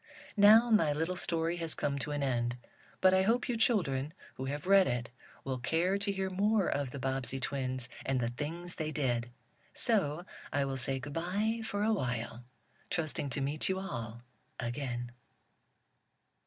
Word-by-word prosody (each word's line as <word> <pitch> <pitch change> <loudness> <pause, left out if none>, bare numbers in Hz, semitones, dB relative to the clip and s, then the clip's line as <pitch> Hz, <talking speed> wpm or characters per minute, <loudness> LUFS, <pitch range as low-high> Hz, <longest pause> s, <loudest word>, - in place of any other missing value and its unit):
Now 220 +3 +7
my 165 -9 +5
little 165 +5 -1
story 165 -1 0
has 165 -2 -3
come 140 -1 -1
to 135 - -4
an 145 -1 -1
end, 120 -2 0 0.4
but 185 0 +6
I 190 - +5
hope 230 +5 +2
you 245 - 0
children 165 - +1 0.2
who 130 - -5
have 145 +2 -3
read 195 0 +6
it 120 -1 -2 0.3
will 130 -1 -2
care 170 +9 +1
to 200 0 0
hear 190 -1 -2
more 205 +1 +2
of 140 -2 0
the 140 - -7
Bobbsey 135 0 -2
twins 130 -1 -2 0.2
and 135 -1 +1
the 115 -1 0
things 165 +8 -4
they 155 -1 -2
did. 120 -5 0 0.5
So 175 - +1 0.3
I 140 0 +1
will 135 -1 -2
say 135 +1 -1
goodbye 180 - -1
for 205 -2 -2
a 220 +1 +3
while, 120 - -2 0.5
trusting 155 -5 -2
to 135 +2 -2
meet 145 +5 0
you 190 - +1
all 120 - -5 0.4
again. 120 -1 -3
145 Hz, 170 wpm, -32 LUFS, 130-190 Hz, 0.5 s, Now